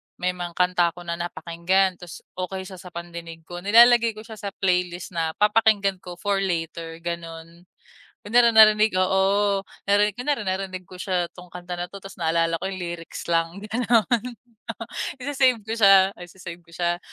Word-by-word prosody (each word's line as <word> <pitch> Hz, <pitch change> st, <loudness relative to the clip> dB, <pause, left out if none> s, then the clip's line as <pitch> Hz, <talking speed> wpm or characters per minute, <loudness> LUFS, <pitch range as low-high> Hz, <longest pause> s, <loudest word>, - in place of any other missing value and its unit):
may 180 Hz, 0 st, -1 dB
mga 175 Hz, -1 st, -7 dB
kanta 180 Hz, -2 st, +2 dB
ako 175 Hz, -, -10 dB
na 170 Hz, 0 st, -4 dB
napakinggan 175 Hz, +2 st, 0 dB
tas 180 Hz, -2 st, -10 dB, 0.2 s
okay 190 Hz, +1 st, -4 dB
siya 185 Hz, -1 st, -10 dB
sa 185 Hz, -, -11 dB
pandinig 170 Hz, -1 st, -9 dB
ko 175 Hz, +1 st, -8 dB
nilalagay 230 Hz, +3 st, +5 dB
ko 215 Hz, -, -9 dB
siya 220 Hz, -2 st, -11 dB
sa 200 Hz, -1 st, -6 dB
playlist 180 Hz, -1 st, 0 dB
na 165 Hz, -2 st, -2 dB
papakinggan 210 Hz, -3 st, +2 dB
ko 180 Hz, -1 st, -9 dB
for 200 Hz, +2 st, -1 dB
later 165 Hz, -3 st, -3 dB
ganon. 170 Hz, 0 st, -7 dB, 0.6 s
Kunwari 235 Hz, +1 st, +4 dB
narinig 215 Hz, -1 st, +6 dB
oo 195 Hz, +2 st, +2 dB, 0.2 s
narinig 205 Hz, 0 st, +3 dB
kunwari 250 Hz, -3 st, -2 dB
narinig 185 Hz, -1 st, -3 dB
ko 185 Hz, -, -14 dB
siya 180 Hz, -1 st, -1 dB
tong 180 Hz, 0 st, -13 dB
kanta 180 Hz, 0 st, -6 dB
na 175 Hz, 0 st, -5 dB
to 200 Hz, -, -9 dB
tas 195 Hz, 0 st, -11 dB
naalala 165 Hz, 0 st, +1 dB
ko -, -, -2 dB
yung 190 Hz, -, -6 dB
lyrics 170 Hz, -1 st, -6 dB
lang 165 Hz, +2 st, 0 dB
ganon, 230 Hz, -1 st, +2 dB, 1.1 s
isi-save 260 Hz, -3 st, +2 dB
ko 220 Hz, -, -3 dB
siya 195 Hz, -3 st, +6 dB
isi-save 175 Hz, -1 st, -10 dB
ko 170 Hz, -, -23 dB
siya 175 Hz, 0 st, 0 dB
185 Hz, 170 wpm, -24 LUFS, 170-205 Hz, 1.1 s, narinig